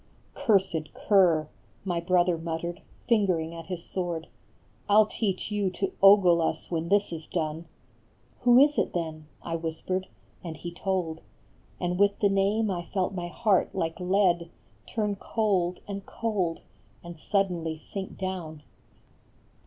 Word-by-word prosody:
" - - -34
Cursed 190 -7 +2
cur," 175 -7 +3 0.4
My 175 -3 0
brother 175 0 +2
muttered, 165 +1 -4 0.3
fingering 185 -8 +2
at 165 -1 -9
his 175 -2 -5
sword, 175 -3 -3 0.3
" - - -34
I 205 - +4
11 215 0 +6
teach 200 -2 -2
you 205 -2 +1
to 195 +2 -2
ogle 195 -4 +7
us 165 - -2
when 165 0 -2
this 205 -2 +2
is 160 -1 -7
done! 160 -1 -3 0.4
" 115 - -35
"Who 245 0 +6
is 290 +2 +5
it, - - 0
then?" 160 -3 -4 0.2
I 165 - -3
whispered, 165 +3 -3 0.4
and 165 -3 -6
he 175 - -6
told; 175 -3 -2 0.6
And 180 0 -1
with 200 0 +4
the 200 - +3
name 200 +2 +2
I 175 -2 -2
felt 190 +2 -1
my 175 -2 -4
heart 195 +2 +1
like 165 -2 -2
lead 180 -2 +2 0.4
Turn 210 -3 -1
cold 190 -5 0
and 200 -1 -5
cold 195 -7 -2 0.4
and 170 -2 -9
suddenly 175 -5 0
sink 190 +4 -7
down. 175 -5 -5
180 Hz, 155 wpm, -27 LUFS, 165-200 Hz, 0.6 s, ogle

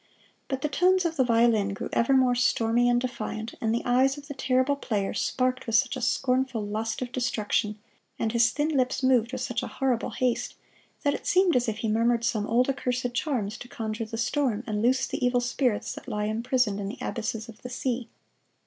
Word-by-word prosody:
But 265 -1 -3
the - - +2
tones 365 +5 +3
of 330 -1 0
the 265 - +3
violin 230 -4 +3
grew - - -4
ever 235 +3 +2
more 260 -2 +4
stormy 245 -1 +2
and 240 0 +3
defiant, 230 -3 -4
and 220 - +1
the 235 - -1
eyes 260 +3 +3
of 290 0 -11
the 285 - -5
terrible 260 +1 +1
player 210 -8 -2
sparkled 255 0 0
with 230 - 0
such 230 - +3
a 260 - -5
scornful 250 0 0
lust 220 +4 -2
of 245 - -7
destruction, 215 -4 -1 0.4
and 225 - -1
his 235 0 +4
thin 295 +4 -1
lips 260 -3 0
moved 250 -3 +3
with 255 -1 -4
such 245 -2 -2
a - - -4
horrible 255 -4 -1
haste, 250 -2 -1 0.5
that 285 -1 +2
it - - -6
seemed 370 -1 +4
as 245 -1 +2
if 215 - -3
he 225 - -2
murmured 230 +2 +2
some 215 -2 0
old 245 +3 +3
accursed 250 -2 -1
charms 240 -6 -2
to 245 - -9
conjure 225 -1 -4
the 225 +1 -6
storm 235 -2 0
and 210 -2 -2
loose 260 +3 +3
the - - -4
evil 245 0 +3
spirits 245 -2 0
that - - -11
lie 210 0 -2
imprisoned 230 -1 0
in 200 - -3
the 220 +7 -6
abysses 225 -1 -3
of 225 -2 -13
the 250 - -7
sea. 250 -2 -3
245 Hz, 210 wpm, -27 LUFS, 225-260 Hz, 0.5 s, more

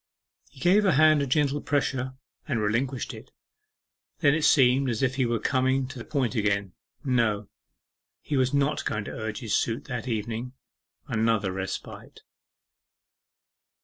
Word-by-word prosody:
He - - -18
gave 185 +8 +4
her 195 -3 +3
hand 155 +1 +5
a 140 - -1
gentle 145 +1 +1
pressure, 130 -3 -1 0.3
and 125 -7 0
relinquished 120 +5 -1
it. - - -11 0.9
Then 145 -3 +4
it 160 - 0
seemed 130 -1 +4
as 115 +1 -1
if 130 -1 +2
he 130 -2 0
were 115 0 0
coming 130 +3 +1
to 130 -1 -8
the - - -8
point 130 -6 -1
again. 100 -4 0 0.3
No, 115 -6 0 0.7
he 150 - -4
was 130 -1 +2
not 140 0 +1
going 105 - -2
to - - -6
urge 110 -1 -5
his 115 -4 -1
suit 115 0 0
that 125 -2 -5
evening. 115 +2 -3 0.5
Another 110 -3 +1
respite. 95 0 -6
125 Hz, 150 wpm, -26 LUFS, 110-140 Hz, 0.9 s, hand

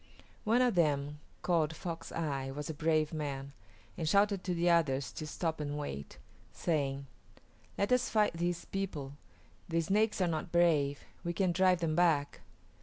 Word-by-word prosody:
One 235 +4 +4
of 245 - +3
them, 145 -4 +1 0.2
called 165 -3 +1
Fox 165 0 -6
Eye, 140 -5 -2
was 145 +3 -4
a - - -6
brave 155 0 +1
man, 140 -3 -4 0.4
and 160 -3 -1
shouted 200 0 +3
to 180 -1 -1
the 170 +1 +1
others 145 -6 +2
to 155 - -6
stop 160 +1 -2
and 145 -1 -3
wait, 70 - -6 0.3
saying, 140 -4 -1 0.7
"Let 200 - 0
us 250 -1 +3
fight 215 -4 +3
these 175 +1 -2
people; 155 -9 -4 0.6
the 165 0 +1
Snakes 210 +7 +1
are 185 - +3
not 165 +1 -2
brave; 155 -5 +3 0.2
we 170 -1 -2
can 185 +1 +1
drive 180 0 +3
them 160 -2 0
back." 160 -5 +2
165 Hz, 165 wpm, -32 LUFS, 145-180 Hz, 0.7 s, One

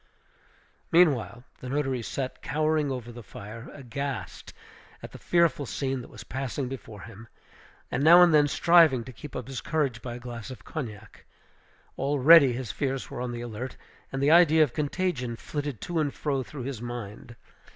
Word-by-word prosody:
Meanwhile 140 -8 +3 0.2
the 125 - -7
notary 135 -3 -1
sat 130 +3 -5
cowering 155 -1 0
over 125 -3 -5
the 120 0 -10
fire, 110 +3 -10
aghast 135 - -6 0.5
at - - -8
the - - -11
fearful 170 -5 +2
scene 135 0 -2
that - - -12
was - - -11
passing 135 +1 -4
before 110 -5 -8
him, 115 0 -12 0.6
and 130 - -1
now 170 +3 +9
and 170 -2 +5
then 150 -1 +5
striving 160 -5 +5
to 130 - -10
keep 150 +5 -10
up 125 -1 -5
his 135 -3 -5
courage 140 -7 -1
by 120 -2 -6
a - - -8
glass 120 -2 -8
of 130 - -10
cognac. 115 - -8 0.7
Already 140 +1 +6
his 120 -3 -4
fears 135 -2 -3
were 120 - -5
on 125 -1 -3
the 120 0 -5
alert; 120 +2 -6 0.3
and 135 0 -2
the 145 - +4
idea 160 -2 +6
of 135 -6 -2
contagion 145 -5 -2
flitted 145 0 -5
to 175 -2 -2
and 145 -3 -1
fro 140 -3 -1
through 130 0 -8
his 130 -3 -5
mind. 120 -1 -7
135 Hz, 175 wpm, -27 LUFS, 120-150 Hz, 0.7 s, now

